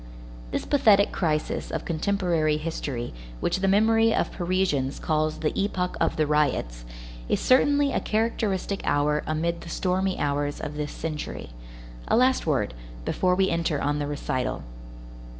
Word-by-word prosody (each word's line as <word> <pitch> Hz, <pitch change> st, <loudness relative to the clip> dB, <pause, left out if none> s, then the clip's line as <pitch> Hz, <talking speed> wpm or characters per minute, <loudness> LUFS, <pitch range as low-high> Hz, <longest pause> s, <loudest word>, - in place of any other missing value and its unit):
This -, -, -3 dB
pathetic 215 Hz, -8 st, +4 dB
crisis 155 Hz, -4 st, -1 dB
of -, -, -4 dB
contemporary 170 Hz, -3 st, +1 dB
history 145 Hz, -, -4 dB, 0.3 s
which -, -, 0 dB
the 195 Hz, -, +1 dB
memory 225 Hz, +3 st, +4 dB
of -, -, 0 dB
Parisians 175 Hz, -7 st, 0 dB
calls 155 Hz, 0 st, 0 dB
"the 155 Hz, -, 0 dB
epoch 185 Hz, -2 st, -1 dB
of 165 Hz, -, +2 dB
the 155 Hz, -, +2 dB
riots," 145 Hz, -, 0 dB, 0.4 s
is -, -, +2 dB
certainly 285 Hz, +2 st, +4 dB
a -, -, +2 dB
characteristic 210 Hz, -3 st, -1 dB
hour 150 Hz, +1 st, +1 dB
amid 170 Hz, +2 st, -1 dB
the 170 Hz, -, -9 dB
stormy 185 Hz, +2 st, 0 dB
hours 145 Hz, 0 st, -1 dB
of 150 Hz, -, -5 dB
this 150 Hz, 0 st, -3 dB
century. 150 Hz, -, -5 dB, 0.6 s
A -, -, +3 dB
last 255 Hz, -5 st, +3 dB
word, 120 Hz, -, +1 dB, 0.3 s
before 180 Hz, -1 st, +1 dB
we 190 Hz, 0 st, +2 dB
enter 165 Hz, -3 st, 0 dB
on 145 Hz, +1 st, 0 dB
the 145 Hz, -, -2 dB
recital. 130 Hz, -3 st, -2 dB
165 Hz, 150 wpm, -26 LUFS, 150-195 Hz, 0.6 s, pathetic